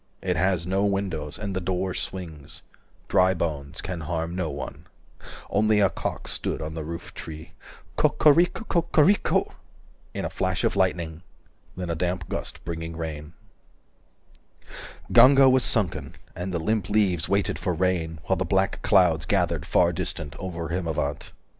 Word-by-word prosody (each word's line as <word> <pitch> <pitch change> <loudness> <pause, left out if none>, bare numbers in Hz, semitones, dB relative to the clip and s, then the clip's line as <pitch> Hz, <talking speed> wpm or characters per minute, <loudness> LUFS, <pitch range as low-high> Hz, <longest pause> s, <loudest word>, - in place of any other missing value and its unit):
It - - 0
has 90 0 +1
no 95 +2 +1
windows, 95 -7 -1
and 100 -2 -4
the 95 - -1
door 95 0 -1
swings, 80 -7 -6 0.4
Dry 95 +1 +4
bones 70 -5 -3
can 90 -3 -5
harm 80 +1 -3
no 90 -4 -1
one. 70 -2 -7 0.3
390 - - -14
Only 105 +1 +3
a 100 -2 +4
cock - - -4
stood - - -2
on 80 0 -5
the 80 -1 -4
roof 85 +2 -7
tree 80 0 -9 0.5
Co - - +4
co 150 - +5
rico 175 +7 +2
co 175 -5 +1
co 165 -1 +2
rico 200 +6 +2 0.6
In - - -2
a - - -2
flash - - -1
of - - +1
lightning. 85 -3 0 0.6
Then 90 -2 -3
a - - -1
damp 90 -1 -2
gust - - -5
Bringing 80 -1 -5
rain 75 -1 -6 1.8
Ganga 135 +1 +8
was 130 -1 +5
sunken, 105 -7 0 0.2
and 90 +2 -4
the 90 - -1
limp 100 +3 -1
leaves 100 -6 +2
395 - - -8
Waited 100 0 +1
for 90 - -1
rain, 85 -3 0
while 95 - 0
the 95 - 0
black 95 +2 0
clouds 85 -6 +3
Gathered - - 0
far - - +3
distant, 75 -1 -5
over 85 -3 -5
Himavant. 85 -3 -2
90 Hz, 165 wpm, -25 LUFS, 80-95 Hz, 1.8 s, Ganga